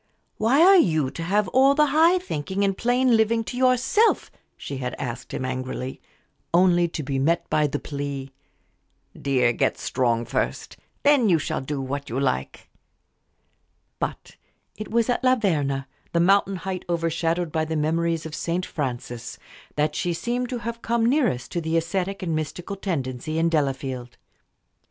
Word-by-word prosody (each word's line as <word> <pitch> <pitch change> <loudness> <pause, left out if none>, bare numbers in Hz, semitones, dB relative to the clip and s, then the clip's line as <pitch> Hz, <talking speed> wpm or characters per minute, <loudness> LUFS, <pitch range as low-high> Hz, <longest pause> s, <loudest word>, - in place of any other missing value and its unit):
"Why 255 +9 +4
are 385 +2 +8
you 155 - +2
to - - -7
have 200 +4 +1
all 270 +4 +5
the 300 0 +5
high 330 +4 +5
thinking 190 - -3
and 195 -1 +1
plain 245 +2 +2
living 225 +1 +2
to 245 - -6
yourself?" 255 - +2 0.3
she 140 - -6
had 125 -1 -4
asked 125 -2 -5
him, 130 - -3
angrily, 130 0 -4 0.5
only 175 -1 +4
to 165 -2 -5
be 135 -1 -2
met 165 +5 +1
by 150 -1 +3
the 145 - -2
plea, 140 -2 -5 0.8
"Dear, 125 -4 +1
get - - 0
strong 120 -2 0
first 120 - -2 0.3
then 280 -6 +5
you 170 - +5
shall 150 - -2
do 140 +1 -4
what 140 +1 -4
you 120 +4 -2
like." 65 - -2 1.3
But - - -5 0.4
it 215 - -7
was 230 0 +2
at 245 +1 0
La 255 0 +5
Verna, 145 - 0 0.3
the 170 - +2
mountain 195 +2 +3
height 185 0 -4
overshadowed 165 0 0
by 160 0 0
the 160 0 -3
memories 165 +1 0
of 160 - -7
St. 170 +3 -2
Francis, 120 -4 -5 0.4
that 150 0 +1
she 175 +3 -1
seemed 245 +7 -2
to 250 - -2
have 235 +1 -5
come 230 -1 +1
nearest 240 - +1
to 170 - -2
the 160 +1 0
ascetic 190 +3 -2
and 165 -3 -1
mystical 155 +5 -4
tendency 155 -5 -3
in 165 +1 +2
Delafield. 135 -5 -2
165 Hz, 165 wpm, -24 LUFS, 140-220 Hz, 1.3 s, are